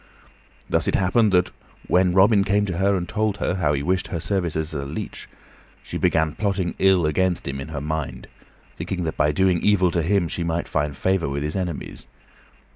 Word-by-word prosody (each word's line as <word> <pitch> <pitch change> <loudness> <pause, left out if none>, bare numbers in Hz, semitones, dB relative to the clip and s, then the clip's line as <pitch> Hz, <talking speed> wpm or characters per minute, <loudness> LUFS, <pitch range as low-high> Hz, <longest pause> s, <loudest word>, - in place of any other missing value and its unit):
Thus - - +1
it - - +1
happened 100 +3 +3
that 90 -1 +2 0.4
when 90 0 +3
Robin 100 +1 +5
came 100 +1 +1
to 90 -4 -3
her 100 +1 +3
and 90 -2 -2
told 105 +1 -1
her 95 - -1
how 80 -6 +1
he 70 -1 -1
wished 95 +4 0
her 85 - -4
services 80 -4 -2
as 70 -2 -4
leech, - - -6 0.5
she - - -5
began 80 -1 +2
plotting 100 -4 -1
ill 95 -3 +4
against 90 +3 0
him 70 0 -3
in 70 - -6
her 75 -3 -5
mind, 80 0 -4 0.5
thinking 90 -2 -4
that 80 - -3
by 75 -1 +2
doing 90 +2 +2
evil 95 -4 +3
to 85 - 0
him 90 +1 +1
she 85 - -3
might 85 0 -2
find 75 -2 -2
favor 95 -6 0
with 70 +1 -3
his 75 +1 -3
enemies. 90 -5 -5
90 Hz, 200 wpm, -23 LUFS, 80-95 Hz, 0.5 s, Robin